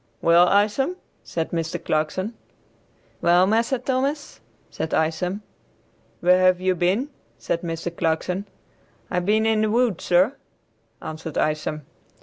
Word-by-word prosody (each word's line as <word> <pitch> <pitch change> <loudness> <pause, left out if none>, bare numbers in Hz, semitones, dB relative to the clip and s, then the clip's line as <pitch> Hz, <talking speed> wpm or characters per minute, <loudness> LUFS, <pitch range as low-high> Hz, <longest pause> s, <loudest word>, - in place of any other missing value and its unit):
"Well, 170 +1 +5
Isom," 215 - +2 0.3
said 165 -1 -3
Mr. 165 -1 -2
Clarkson. 155 +8 -1 0.9
"Well, 175 +2 +5
Massa 230 +6 +1
Thomas," 270 +4 -2 0.3
said 160 - -3
Isom. 175 +6 -1 0.8
"Where 180 +1 +5
have 185 -1 +4
you 185 0 +1
been?" 185 - 0 0.3
said 165 +8 -2
Mr. 170 0 -4
Clarkson. 180 +4 -1 0.6
"I 180 - +1
been 210 +5 +2
in 220 -1 +2
the 215 - +1
woods, 230 -4 +1
sir," 185 +8 +4 0.7
answered 155 0 -6
Isom. 155 -1 -1
180 Hz, 125 wpm, -23 LUFS, 165-215 Hz, 0.9 s, Well